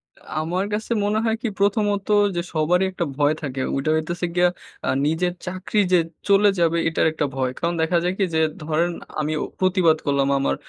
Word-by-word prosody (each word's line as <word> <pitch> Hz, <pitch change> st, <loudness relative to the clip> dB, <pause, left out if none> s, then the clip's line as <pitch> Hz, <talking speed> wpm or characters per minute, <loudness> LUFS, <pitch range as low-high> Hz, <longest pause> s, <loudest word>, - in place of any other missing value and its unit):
আ -, -, -25 dB, 0.2 s
আমার 180 Hz, +5 st, -1 dB
কাছে 215 Hz, +2 st, -3 dB
মনে 210 Hz, +1 st, +1 dB
হয় 225 Hz, -1 st, +2 dB
কি? 245 Hz, -, -1 dB
প্রথমত 205 Hz, -1 st, +1 dB, 0.3 s
যে 175 Hz, -, 0 dB
সবারই 175 Hz, +4 st, +2 dB
একটা 180 Hz, -2 st, -2 dB
ভয় 145 Hz, +1 st, +3 dB
থাকে। 135 Hz, -3 st, -4 dB
ওইটা 135 Hz, +3 st, -1 dB
হইতেছে 175 Hz, +3 st, -2 dB
গিয়ে 180 Hz, 0 st, +5 dB, 0.4 s
আ -, -, +1 dB, 0.2 s
নিজের 170 Hz, +4 st, 0 dB
চাকরি 185 Hz, +3 st, -2 dB
যে 180 Hz, -, +6 dB, 0.3 s
চলে 200 Hz, 0 st, +5 dB
যাবে, 170 Hz, 0 st, +2 dB
এটার 165 Hz, -, +1 dB
একটা 155 Hz, -1 st, -1 dB
ভয়। 130 Hz, -1 st, 0 dB
কারণ 170 Hz, 0 st, 0 dB
দেখা 165 Hz, +2 st, +2 dB
যায় 180 Hz, -, 0 dB
কি? 200 Hz, -, +1 dB
যে -, -, +3 dB, 0.2 s
ধরেন 160 Hz, +3 st, 0 dB, 0.3 s
আমিও 155 Hz, 0 st, -1 dB, 0.2 s
প্রতিবাদ 185 Hz, -4 st, +3 dB
করলাম 140 Hz, -1 st, +1 dB
আমার 135 Hz, -, +1 dB
175 Hz, 190 wpm, -22 LUFS, 155-190 Hz, 0.4 s, যে